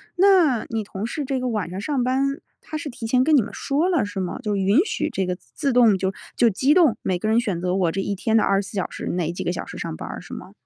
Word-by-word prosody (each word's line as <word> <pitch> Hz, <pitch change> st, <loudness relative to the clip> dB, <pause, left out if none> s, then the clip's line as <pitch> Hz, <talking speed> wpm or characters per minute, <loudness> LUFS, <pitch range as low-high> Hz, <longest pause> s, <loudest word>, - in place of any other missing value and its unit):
那 355 Hz, -, +4 dB
你 225 Hz, -1 st, -2 dB
同 200 Hz, +1 st, -5 dB
事 290 Hz, +4 st, -3 dB
这 265 Hz, 0 st, -1 dB
个 255 Hz, -, -2 dB
晚 210 Hz, -8 st, -2 dB
上 185 Hz, +3 st, -5 dB
上 275 Hz, 0 st, -1 dB
班， 270 Hz, +2 st, 0 dB, 0.2 s
他 310 Hz, -, -6 dB
是 300 Hz, -1 st, -5 dB
提 240 Hz, -3 st, -7 dB
前 255 Hz, +2 st, +3 dB
跟 310 Hz, +2 st, +4 dB
你 270 Hz, -, +6 dB
们 215 Hz, -, -6 dB
说 300 Hz, +6 st, 0 dB
了， 335 Hz, -, +2 dB
是 205 Hz, -1 st, -5 dB
吗？ 185 Hz, -2 st, -3 dB
就 210 Hz, -5 st, -2 dB
允 195 Hz, +6 st, +3 dB
许 -, -, -2 dB
这 190 Hz, -, -1 dB
个 180 Hz, 0 st, -2 dB
自 275 Hz, -, -3 dB
动 230 Hz, -5 st, +5 dB
就 190 Hz, 0 st, -1 dB, 0.2 s
就 235 Hz, -, +4 dB
机 265 Hz, +9 st, +2 dB
动， 315 Hz, -11 st, +4 dB
每 180 Hz, -2 st, -1 dB
个 215 Hz, -, -2 dB
人 225 Hz, +1 st, +4 dB
选 205 Hz, -8 st, -2 dB
择 180 Hz, 0 st, 0 dB
我 180 Hz, -4 st, +1 dB
这 195 Hz, -, -2 dB
一 200 Hz, +1 st, -2 dB
天 220 Hz, +3 st, +1 dB
的 -, -, +4 dB
24 195 Hz, +1 st, 0 dB
小 190 Hz, -, -1 dB
时， -, -, -7 dB
哪 170 Hz, -2 st, -1 dB
几 175 Hz, -, -5 dB
个 -, -, -1 dB
小 -, -, -4 dB
时 -, -, -9 dB
上 -, -, -4 dB
班 -, -, -7 dB
儿， -, -, -7 dB
是 -, -, -11 dB
吗？ -, -, -8 dB
225 Hz, 305 characters per minute, -23 LUFS, 195-275 Hz, 0.2 s, 你